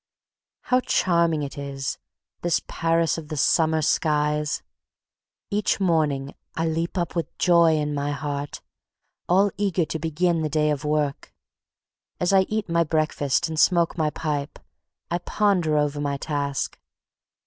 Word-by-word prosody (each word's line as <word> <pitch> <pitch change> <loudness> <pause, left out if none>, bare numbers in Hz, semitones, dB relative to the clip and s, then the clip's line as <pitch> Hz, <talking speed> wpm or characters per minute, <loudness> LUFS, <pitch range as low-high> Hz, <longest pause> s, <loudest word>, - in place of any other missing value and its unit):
How 250 0 +2
charming 170 -9 +2
it 140 0 -6
is, 140 -1 -4 0.4
this 175 -1 +1
Paris 165 0 +1
of 155 - -10
the 155 - -5
summer 160 +2 +3
skies! 150 -1 +1 0.9
Each 205 -1 +1
morning 150 -7 +1 0.2
I 165 - 0
leap 165 +3 -2
up 175 -1 -2
with 170 - -3
joy 170 -3 +5
in 150 -1 -1
my 145 0 -1
heart, 145 -1 -4 0.7
all 195 +3 +4
eager 190 -4 +1
to 160 - -4
begin 165 +2 0
the 155 - -1
day 150 0 +2
of 145 0 -2
work. 150 -1 -1 0.8
As 175 +2 +1
I 190 -1 +4
eat 215 -1 -1
my 170 0 +2
breakfast 155 0 0
and 160 -1 -3
smoke 170 -2 +3
my 155 -3 +1
pipe, 150 -2 -3 0.5
I 175 - +1
ponder 180 -5 +1
over 145 0 0
my 140 -1 -1
task. 140 -1 -3
160 Hz, 145 wpm, -24 LUFS, 150-170 Hz, 0.9 s, joy